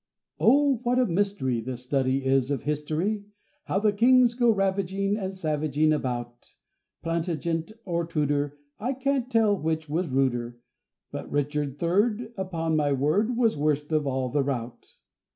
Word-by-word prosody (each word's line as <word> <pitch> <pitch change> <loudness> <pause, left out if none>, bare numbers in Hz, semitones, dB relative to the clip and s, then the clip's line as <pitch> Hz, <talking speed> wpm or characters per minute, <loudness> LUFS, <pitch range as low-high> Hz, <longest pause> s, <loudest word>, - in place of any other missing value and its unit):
OH! 275 0 +4
what 250 0 +1
a 255 - +4
mystery 175 - 0
The 125 +2 -5
study 130 +1 0
is 135 0 +2
of 140 -3 -2
history! 155 +8 -1 0.4
How - - -1
the 210 +1 +2
kings 245 +2 +5
go 240 -1 +2
ravaging 195 -1 +1
And 190 -3 -3
savaging 155 -3 +1
about! 120 -4 -4 0.5
Plantagenet 165 +2 -2
or 170 -2 -1
Tudor, 145 -2 -1 0.2
I 245 +6 -1
can't 265 -1 -1
tell 225 -4 +3
which 160 -3 -2
was 165 +2 -1
ruder; 120 -3 0 0.5
But - - -6
Richard 145 -1 -1
Third, 210 +8 0
Upon 165 -5 -2
my 145 -2 +2
word, 195 - +1
Was 230 -3 +3
worst 150 0 0
of 155 -2 +1
all 130 -1 -1
the 145 +3 +1
rout. 125 -4 -5
160 Hz, 150 wpm, -26 LUFS, 140-205 Hz, 0.5 s, kings